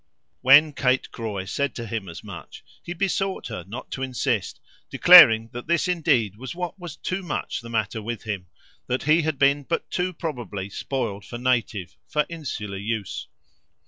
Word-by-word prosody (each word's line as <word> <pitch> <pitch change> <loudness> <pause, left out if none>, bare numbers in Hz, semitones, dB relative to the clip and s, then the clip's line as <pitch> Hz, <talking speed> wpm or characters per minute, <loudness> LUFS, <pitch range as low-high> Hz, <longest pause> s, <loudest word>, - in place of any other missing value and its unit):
When 145 +4 +7
Kate 130 -1 +1
Croy 105 -5 -4
said 140 +8 -2
to 115 - -5
him 110 -4 -4
as 85 - -9
much - - -10 0.2
he 175 - -8
besought 195 +2 -1
her 90 - -6
not 115 +6 -8
to 135 - -5
insist, 130 -5 -1 0.3
declaring 115 0 +8
that 120 +3 -7
this 170 +2 +2
indeed 140 - +1
was 130 +6 -7
what 180 +2 -5
was 175 -4 -7
gravely 185 +3 -3 0.2
the 115 - -10
matter 110 -1 -1
with 115 0 -5
him, 100 -5 -4 0.4
that 125 +1 -1
he 155 +3 +4
had 155 -2 -1
been 140 +1 +3
but 165 +4 -3
too 180 +1 0
probably 120 - -5
spoiled 110 -5 -3
for 120 - -7
native, 120 -7 -1
for 150 -1 +1
insular 130 -12 -5
use. 105 -1 -4
125 Hz, 170 wpm, -24 LUFS, 110-155 Hz, 0.4 s, declaring